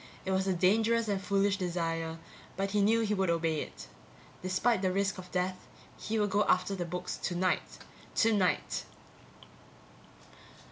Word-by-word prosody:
It 190 - -1
was 190 0 +1
a 190 - +2
dangerous 225 +5 +3
and 200 -2 0
foolish 200 0 +2
desire, 165 -3 -2 0.4
but 195 0 -1
he 205 0 +2
knew 225 +3 +4
he 210 -1 +1
would 190 -3 +1
obey 165 -2 +1
it. - - -8 0.6
Despite 185 +4 +1
the 185 -1 +1
risk 195 0 0
of 180 0 -10
death, 185 0 -2 0.3
he 220 +2 -3
would 205 -2 +1
go 205 +2 +3
after 185 +2 +2
the 180 -3 -2
books 180 +1 -4
tonight. 180 +1 -1 0.4
_Tonight. 205 -5 +2
190 Hz, 150 wpm, -31 LUFS, 180-205 Hz, 0.6 s, knew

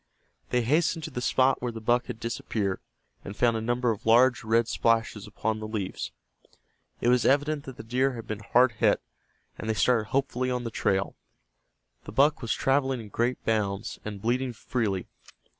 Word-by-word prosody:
They 125 -1 +1
hastened 160 +5 +1
to 160 - -5
the 125 - -4
spot 130 +1 +2
where 125 -1 -2
the 115 - -7
buck 120 +2 +1
had - - -6
disappeared, 110 -4 -2 0.4
and 100 - -8
found 120 -2 +3
a 110 - -2
number 120 +1 +1
of 105 - -5
large 120 +1 +5
red 115 +1 +2
splashes 115 -3 0
upon 110 +1 -2
the 110 - -5
leaves. 105 -4 -4 0.9
It 120 - +2
was 125 -1 +4
evident 145 +1 +2
that 130 - -9
the - - -8
deer 130 +4 +1
had 115 -2 -7
been 110 -1 -4
hard 125 +4 +3
hit, 110 - +2 0.6
and 110 - -4
they 110 - +1
started 115 -1 +3
hopefully 130 -1 0
on 125 -1 -1
the 115 - -4
trail. 95 -1 0 0.9
The - - -7
buck 145 +5 +3
was 115 - -3
traveling 135 -1 +1
in 110 -2 -9
great 120 +5 -1
bounds, 100 -3 -1
and 105 -2 -6
bleeding 125 +2 0
freely. 110 -5 -2
115 Hz, 185 wpm, -27 LUFS, 110-130 Hz, 0.9 s, large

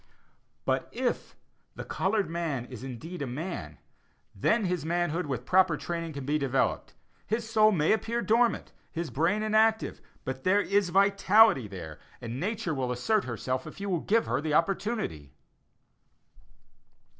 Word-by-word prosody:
But - - 0
if - - -2 0.4
the - - -7
colored 200 0 0
man 160 -7 -2
is 125 -1 -10
indeed 140 +7 -7
a 140 - -2
man, 125 - -5 0.6
then 215 - +1
his 180 -4 -1
manhood 175 0 -1
with 125 -3 -3
proper 185 -3 +4
training 165 -1 -4
can 140 -2 -6
be 150 +2 +1
developed. 135 -2 0 0.3
His 220 +1 -1
soul 215 -1 +5
may 160 -6 +2
appear 230 +2 0
dormant, 230 -1 +2 0.2
his 165 -4 -4
brain 170 - +1
inactive, 220 +1 +2 0.2
but 130 0 -4
there 195 +2 +4
is 200 -2 +1
a - - -9
vitality 200 - +5
there; 85 -6 -8 0.2
and 120 +1 -5
Nature 200 -1 -2
will 130 -3 -2
assert 200 - +1
herself 130 +3 -3
if 155 - -10
you 200 0 -3
will 175 - +1
give 225 +7 +2
her 120 +4 -1
the 155 -1 0
opportunity. 170 - -1
170 Hz, 155 wpm, -28 LUFS, 130-205 Hz, 0.6 s, soul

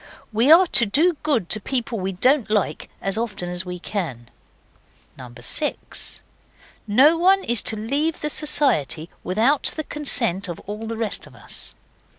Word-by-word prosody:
We 235 +7 +4
are 350 +4 +8
to 235 -9 +4
do 320 - +3
good 275 - 0
to 215 - +2
people 240 -1 -2
we 190 +1 -3
don't 255 +5 +2
like 210 -2 -1
as 195 +3 0
often 205 -6 -3
as 180 +1 -2
we 180 0 -5
can. 160 - -5 1.1
6. 295 - -3 0.7
No 280 +10 +5
one 385 +2 +4
is 235 -2 +1
to 220 - +1
leave 280 +9 -1
the 300 - -1
Society 225 - +1
without 230 +10 +2
the 310 - -2
consent 235 - -1
of 170 -2 -6
all 210 +2 -6
the 225 0 -4
rest 225 -2 -3
of - - -17
us. - - -8
225 Hz, 160 wpm, -22 LUFS, 195-295 Hz, 1.1 s, are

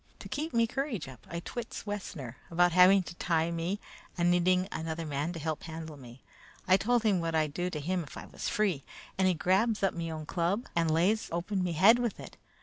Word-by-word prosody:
To - - -9
keep 310 +3 -3
me 230 0 +3
courage 240 - -3
up, 130 -1 -13
I 170 0 -4
twits 240 +6 -6
Wessner 185 - -5
about 175 +1 +3
having 185 +2 +7
to 175 - -8
tie 165 -1 0
me 170 +4 -2 0.4
and 175 0 +3
needing 180 +1 +3
another 160 0 -4
man 150 +2 -2
to 165 - -6
help 155 0 -3
handle 160 -1 -7
me. 125 -2 -13 0.4
I 185 - +7
told 235 +4 +2
him 205 -5 +3
what 165 -1 -1
I'd 155 -2 +1
do 180 +3 -1
to 155 - -4
him 180 +5 -1
if 150 - -9
I - - -7
was - - -5
free, 195 - 0 0.4
and 190 - +4
he 185 - +3
grabs 200 +6 +2
up 195 - +3
me 165 -1 -4
own 155 -1 -5
club 180 +8 0
and 165 -1 +2
lays 180 +8 +2
open 180 +3 -1
me 175 -2 -1
head 200 +9 +6
with 240 -3 -2
it. - - -10
175 Hz, 225 wpm, -30 LUFS, 160-195 Hz, 0.4 s, having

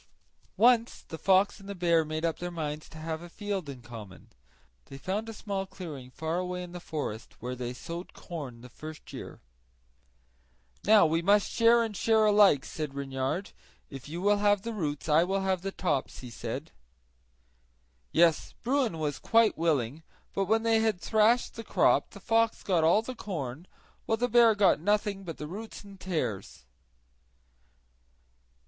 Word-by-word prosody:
Once 235 0 +4
the 160 - -6
fox 190 +4 +3
and 195 0 -12
the 200 - -4
bear 170 -2 +3
made 155 +1 -3
up 165 - -1
their 175 - -3
minds 155 -3 -5
to 160 - -12
have 160 0 -4
a 175 - -10
field 200 -4 -4
in 130 -3 -9
common. 110 -6 -11 0.5
They 135 - -10
found 205 +9 -3
a - - -4
small 200 -3 -4
clearing 160 -9 -8
far 160 +6 -3
away 180 0 -3
in 175 - -9
the 175 - -7
forest, 145 -10 -5
where 125 +2 -4
they 125 -1 -4
sowed 170 +7 -7
rye 160 -6 -6
the 125 - -11
first 155 +5 -10
year. - - -8 1.4
"Now 210 -3 +7
we 165 +1 +1
must 200 +3 +3
share 230 0 +5
and 220 -2 -4
share 220 +1 +3
alike," 205 -9 +5
said 150 -3 -5
Reynard; 135 +6 -3 0.4
"if 135 0 -9
you 170 +3 -5
will 205 0 +4
have 205 -1 +2
the 230 - -4
roots 150 -9 -3
I 155 +2 +5
will 195 +2 0
have 190 -2 0
the 195 +1 -3
tops," 150 -9 -2
he 125 -2 -9
said. 120 +6 -5 1.4
Yes, 165 -2 +3
Bruin 250 -8 +1
was 150 -2 -2
quite 230 -1 +4
willing; 150 -4 0 0.3
but 195 - 0
when 225 +3 +2
they 225 -1 +3
had 220 -4 +1
thrashed 220 +5 +3
the 230 - -7
crop - - +3
the - - -12
fox 225 0 +1
got 175 -5 +2
all 175 +7 +4
the 255 - -5
corn, 165 - -5 0.4
while 225 - +2
the 245 +2 +1
bear 235 -2 +6
got 200 -6 +4
nothing 205 +2 0
but 165 -4 -7
the 150 - -6
roots 210 +9 -8
and 200 -1 -13
tares. 125 - -3
180 Hz, 175 wpm, -29 LUFS, 150-210 Hz, 1.4 s, Now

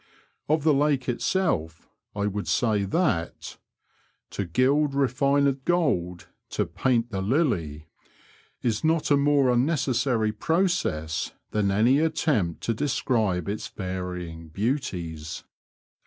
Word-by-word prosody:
" - - -44
Of 155 -1 +2
the 155 -1 +4
lake 140 -1 +1
itself 120 - -1 0.3
I 100 0 -1
would 105 0 -3
say 110 -4 +1
that 100 - 0
♦* - - -9 0.7
To 100 - -3
gild 135 - +2
refined 140 +1 +2
gold, 110 - 0 0.2
to - - -1
paint 120 -2 0
the 95 -1 -2
lily," 95 - 0 0.8
is 110 -3 0
not 160 -1 +1
a - - +7
more 140 -2 +3
unnecessary 125 -4 +1
process 160 - -1 0.2
than 105 -2 +1
any 115 +8 +4
attempt 145 - 0
to 115 - 0
describe 110 - 0
its 105 +2 -3
varying 90 -3 -5
beauties. 85 - -3
120 Hz, 120 wpm, -26 LUFS, 95-140 Hz, 0.8 s, a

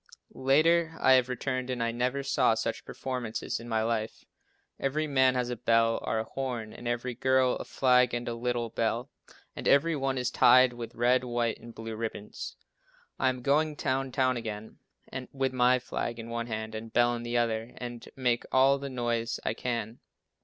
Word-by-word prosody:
Later 160 +5 +3
I 130 - +4
have 130 -1 +5
returned 130 0 -2
and 125 -2 -1
I 115 - 0
never 125 +4 -1
saw 135 -4 +3
such 115 0 -3
performances 125 -5 -4
in 120 +1 -9
my 110 -1 +1
life. 110 -1 -2 0.5
Every 150 +3 0
man 130 -3 +3
has 125 -1 -1
a - - -2
bell 115 0 +2
or - - -1
a 110 - 0
horn, 120 -2 -4
and 120 - -8
every 120 +1 -2
girl 130 +1 +2
a - - -6
flag 125 -2 +3
and 120 0 -4
a 120 - -1
little 120 -1 -2
bell, 115 +2 -1 0.4
and - - -4
every 155 +4 +4
one 135 -2 -1
is 125 0 -1
tied 130 0 +6
with 120 -1 -8
red, 125 +2 +3
white 120 -2 -1
and 115 0 -12
blue 115 0 -6
ribbons. 110 -2 -6 0.6
I 130 - +3
am 125 -1 -4
going 150 +3 +2
down 135 -1 -1
town 130 -1 +1
again 110 -2 -6 0.3
now, 130 -1 -5
with 135 -1 -1
my 125 0 +4
flag 120 -1 -4
in 115 0 -7
one 115 0 -3
hand 110 -1 -4
and 110 +1 -7
bell 120 0 +3
in 120 - -4
the 120 0 -2
other 115 0 -1
and 120 -1 -7
make 125 -3 +1
all 135 +1 +4
the 140 0 -5
noise 120 -2 -2
I - - +1
can. 115 -1 -3
125 Hz, 195 wpm, -29 LUFS, 115-130 Hz, 0.6 s, tied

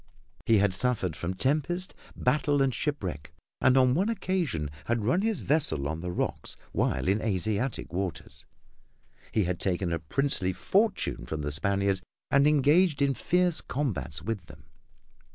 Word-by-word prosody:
He 115 - +5
had 100 -1 +3
suffered 95 -5 0
from 90 +3 -3
tempest, 155 - 0 0.2
battle 145 +2 +1
and 135 -2 +2
shipwreck, 95 - -3 0.3
and 130 0 +5
on 130 -1 +5
one 190 - +1
occasion 175 - -1
had 115 -2 0
run 150 - +2
his 220 -3 0
vessel 140 - +1
on 80 +2 -4
the 90 - -4
rocks - - -3 0.2
while - - 0
in 100 +3 +2
Asiatic 105 +1 -1
waters. 90 -6 -4 0.9
He 110 - +2
had 90 -1 -2
taken 90 -2 -1
a 85 - -1
princely 95 - -1
fortune 200 - 0
from 75 +2 -3
the 75 - -2
Spaniards 100 +5 +1 0.3
and 140 +1 +5
engaged 150 +2 +4
in 140 -1 +3
fierce 180 +3 +1
combats 90 - -3
with 100 -4 -4
them. - - -14
115 Hz, 155 wpm, -28 LUFS, 90-145 Hz, 0.9 s, He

